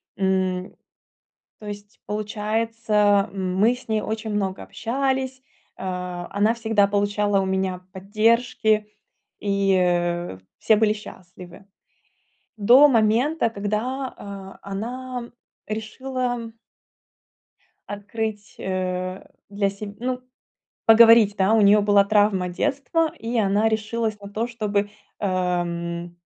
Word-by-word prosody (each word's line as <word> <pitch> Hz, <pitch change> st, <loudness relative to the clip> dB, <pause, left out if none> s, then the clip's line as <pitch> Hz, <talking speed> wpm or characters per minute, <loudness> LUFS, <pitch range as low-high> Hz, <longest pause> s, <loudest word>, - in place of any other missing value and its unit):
М. 190 Hz, -1 st, -1 dB, 0.8 s
То 215 Hz, -, -11 dB
есть 205 Hz, 0 st, -9 dB
получается, 210 Hz, -1 st, 0 dB
мы 195 Hz, +4 st, +1 dB
с 250 Hz, -, -14 dB
ней 215 Hz, -1 st, 0 dB
очень 220 Hz, 0 st, -4 dB
много 195 Hz, -2 st, -2 dB
общались. 265 Hz, +1 st, -2 dB, 0.4 s
Э, 180 Hz, -1 st, -4 dB
она 205 Hz, +3 st, +2 dB
всегда 225 Hz, -3 st, +2 dB
получала 205 Hz, 0 st, +1 dB
у 190 Hz, -, -1 dB
меня 190 Hz, -1 st, -1 dB
поддержки, 215 Hz, +1 st, +1 dB, 0.5 s
и, 200 Hz, -1 st, +1 dB
э, 175 Hz, -, 0 dB, 0.2 s
все 220 Hz, -, +4 dB
были 215 Hz, 0 st, +3 dB
счастливы. 185 Hz, -3 st, -12 dB, 0.9 s
До 245 Hz, +8 st, +7 dB
момента, 235 Hz, +4 st, +2 dB
когда, 225 Hz, +6 st, -3 dB
а, 195 Hz, -1 st, -9 dB
она 240 Hz, +5 st, -5 dB, 0.4 s
решила 245 Hz, +2 st, -4 dB, 1.4 s
открыть, 205 Hz, +1 st, -5 dB
э, 185 Hz, 0 st, -3 dB, 0.2 s
для 200 Hz, 0 st, 0 dB
себ 200 Hz, +1 st, -8 dB
ну, 250 Hz, +1 st, -2 dB, 0.6 s
поговорить, 225 Hz, -2 st, +7 dB
да. 195 Hz, +3 st, +2 dB
У 225 Hz, -, +5 dB
неё 205 Hz, +1 st, +6 dB
была 200 Hz, -1 st, +4 dB
травма 205 Hz, -3 st, +2 dB
детства, 285 Hz, -, 0 dB
и 230 Hz, +2 st, -2 dB
она 205 Hz, +1 st, +2 dB
решилась 220 Hz, 0 st, -2 dB
на 200 Hz, -, -9 dB
то, 220 Hz, +3 st, -2 dB
чтобы, 210 Hz, -4 st, -1 dB, 0.3 s
эм, 175 Hz, -2 st, -2 dB
210 Hz, 105 wpm, -23 LUFS, 195-225 Hz, 1.4 s, До